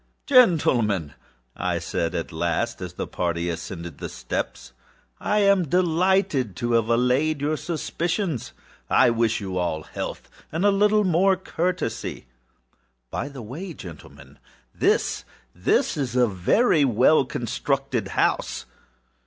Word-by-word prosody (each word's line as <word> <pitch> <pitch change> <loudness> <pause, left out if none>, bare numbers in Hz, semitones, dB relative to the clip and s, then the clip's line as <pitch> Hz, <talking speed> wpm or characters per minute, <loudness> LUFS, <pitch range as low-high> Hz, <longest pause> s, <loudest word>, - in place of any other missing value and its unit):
âGentlemen,â 120 - +4 0.4
I - - -1
said 85 -1 -2
at 85 - -3
last, 85 0 -1
as - - -6
the - - -4
party 85 0 -2
ascended 85 -1 -6
the - - -5
steps, - - -5 0.5
âI 200 -5 +3
delight 175 - +2
to 120 +5 -2
have 115 -1 +2
allayed 125 +6 +2
your 150 +2 0
suspicions. 170 - -2 0.4
I 120 - +5
wish 115 -1 +1
you 95 -3 -3
all 80 -3 -1
health, - - -6 0.2
and 165 +5 0
a 205 - +6
little 210 +1 +3
more 190 +1 +3
courtesy. 180 - -3 0.9
By 140 - -3
the 135 -4 -9
bye, 165 - -7
gentlemen, 85 -5 -12 0.4
thisâthis - - 0
is 130 -5 -3
a 125 -1 +5
very 145 - +3
well 130 +4 +4
constructed 130 -2 -2
house. - - 0
130 Hz, 120 wpm, -24 LUFS, -, 0.9 s, a